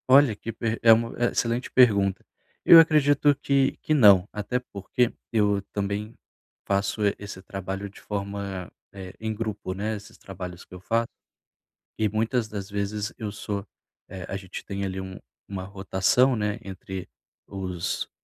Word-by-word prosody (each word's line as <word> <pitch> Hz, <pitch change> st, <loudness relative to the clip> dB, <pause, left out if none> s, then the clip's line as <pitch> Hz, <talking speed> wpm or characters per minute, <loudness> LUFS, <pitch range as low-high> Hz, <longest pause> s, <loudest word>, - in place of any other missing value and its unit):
Olha 135 Hz, -4 st, +7 dB
que 115 Hz, -, -6 dB
per 115 Hz, 0 st, -2 dB
é 115 Hz, -, +7 dB
uma 115 Hz, +1 st, +3 dB
é 120 Hz, 0 st, +1 dB
excelente 120 Hz, +1 st, -1 dB
pergunta. 100 Hz, -6 st, +4 dB, 0.4 s
Eu 165 Hz, -, +11 dB
acredito 145 Hz, -2 st, +4 dB
que 140 Hz, -1 st, +1 dB
que 155 Hz, -, 0 dB
não, 100 Hz, -9 st, +7 dB
até 105 Hz, +4 st, -2 dB
porque, 120 Hz, +1 st, -1 dB, 0.2 s
eu 105 Hz, -2 st, +2 dB
também 100 Hz, +2 st, -2 dB, 0.5 s
faço, 100 Hz, +2 st, 0 dB
eh, 100 Hz, -, +2 dB
esse 100 Hz, -2 st, -8 dB
trabalho 95 Hz, +1 st, -5 dB
de 95 Hz, -, -16 dB
forma, 100 Hz, -2 st, -5 dB, 0.2 s
eh, 95 Hz, -2 st, -8 dB
em 110 Hz, 0 st, -2 dB
grupo, 110 Hz, -4 st, -4 dB
né, 105 Hz, +3 st, -2 dB
esses 105 Hz, 0 st, -11 dB
trabalhos 90 Hz, -2 st, -8 dB
que -, -, -17 dB
eu 90 Hz, -, -8 dB
faço. 115 Hz, +4 st, 0 dB, 0.9 s
E, 110 Hz, -1 st, +1 dB
muitas 110 Hz, +3 st, 0 dB
das 100 Hz, -2 st, -6 dB
vezes, 100 Hz, +1 st, -3 dB
eu 105 Hz, -2 st, -4 dB
sou, 100 Hz, -1 st, -4 dB, 0.4 s
eh, 95 Hz, -2 st, -7 dB
a -, -, -4 dB
gente 95 Hz, -1 st, -8 dB
tem 100 Hz, 0 st, -4 dB
ali 95 Hz, 0 st, -4 dB
um 95 Hz, 0 st, -8 dB, 0.3 s
uma 95 Hz, -2 st, -5 dB
rotação, 100 Hz, +6 st, +2 dB
né, 105 Hz, -1 st, -1 dB
entre 95 Hz, -1 st, -7 dB, 0.4 s
os 95 Hz, -2 st, -3 dB
100 Hz, 160 wpm, -26 LUFS, 95-115 Hz, 0.9 s, Eu